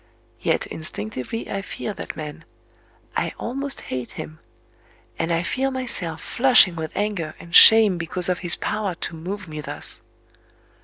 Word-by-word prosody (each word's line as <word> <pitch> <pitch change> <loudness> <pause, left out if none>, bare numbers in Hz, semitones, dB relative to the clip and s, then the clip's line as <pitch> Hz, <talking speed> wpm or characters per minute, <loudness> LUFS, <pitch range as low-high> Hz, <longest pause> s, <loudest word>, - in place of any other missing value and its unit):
Yet - - +1
instinctively 130 - -5
I 195 - -3
fear 205 +1 -5
that - - -6
man;—I 155 +1 -8
almost 275 +3 -3
hate 125 -2 -5
him; 155 0 -8 0.8
and 165 - -1
I 165 +1 +1
feel 265 +8 0
myself 200 -11 -2
flushing 245 -8 +5
with 160 -1 -4
anger 200 -7 -2
and 170 - -13
shame 215 -4 +8
because 175 +2 +1
of 180 -1 0
his 175 -2 +3
power 205 -4 -2
to 165 - -5
move 185 +4 -6
me 155 -1 -6
thus... - - 0
175 Hz, 145 wpm, -23 LUFS, 160-215 Hz, 0.8 s, shame